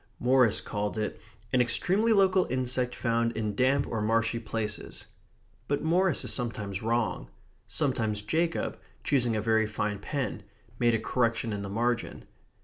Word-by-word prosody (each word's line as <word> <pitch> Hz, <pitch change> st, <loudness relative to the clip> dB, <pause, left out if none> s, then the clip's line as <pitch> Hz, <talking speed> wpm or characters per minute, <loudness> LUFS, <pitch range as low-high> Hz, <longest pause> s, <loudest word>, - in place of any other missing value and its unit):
Morris 125 Hz, -3 st, +4 dB
called 105 Hz, 0 st, -3 dB
it 110 Hz, -, -3 dB, 0.3 s
"an 130 Hz, -, +5 dB
extremely 195 Hz, -, +2 dB
local 190 Hz, -3 st, +4 dB
insect 125 Hz, -1 st, -1 dB
found 115 Hz, -1 st, 0 dB
in 110 Hz, -2 st, -2 dB
damp 130 Hz, +5 st, +2 dB
or 115 Hz, -, -2 dB
marshy 115 Hz, +2 st, +1 dB
places." 110 Hz, -1 st, -4 dB, 0.6 s
But 145 Hz, 0 st, -1 dB
Morris 180 Hz, +3 st, +2 dB
is -, -, +1 dB
sometimes 105 Hz, -6 st, -3 dB
wrong. 115 Hz, +1 st, -1 dB, 0.4 s
Sometimes 115 Hz, -8 st, 0 dB
Jacob, 165 Hz, +9 st, -1 dB, 0.2 s
choosing 120 Hz, -5 st, +1 dB
a 105 Hz, -, 0 dB
very 110 Hz, -1 st, +2 dB
fine 105 Hz, -1 st, -2 dB
pen, 140 Hz, +5 st, -3 dB, 0.4 s
made 120 Hz, -1 st, +3 dB
a -, -, 0 dB
correction 115 Hz, -1 st, 0 dB
in 100 Hz, -, -3 dB
the 100 Hz, -, -5 dB
margin. 120 Hz, +3 st, -1 dB
115 Hz, 145 wpm, -28 LUFS, 110-130 Hz, 0.6 s, an